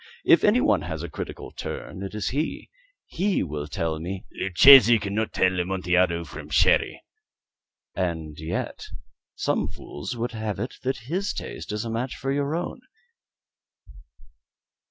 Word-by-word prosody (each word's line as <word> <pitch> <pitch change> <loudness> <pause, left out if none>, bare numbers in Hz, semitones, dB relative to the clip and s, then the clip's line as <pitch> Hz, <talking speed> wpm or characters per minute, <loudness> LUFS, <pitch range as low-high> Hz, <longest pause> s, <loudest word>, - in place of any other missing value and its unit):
If - - +6
any - - +5
one - - +3
has - - -5
a - - -5
critical - - -7
turn, 95 - -7
it 100 +2 -6
is 105 - -1
he. 150 +5 -3 0.3
He 190 +2 0
will 75 -3 -5
tell 80 0 -2
me 95 +4 -5
" - - -34
"Luchesi 120 +6 +8
cannot 105 +2 -2
tell 95 -1 +2
Amontillado 90 -1 +1
from 75 -2 -9
Sherry." 75 - +2 0.9
"And 80 -4 -3
yet 80 +3 -4 0.5
some - - 0
fools 75 +11 -7
will 120 +1 -1
have 110 -3 -4
it 120 +6 -5
that 130 -2 -2
his 185 +9 -2
taste - - -6
is 105 +2 -3
a 115 - -3
match 120 +3 -3
for 135 - -3
your 140 +2 0
own." 175 - -4
100 Hz, 150 wpm, -25 LUFS, 85-125 Hz, 0.9 s, Luchesi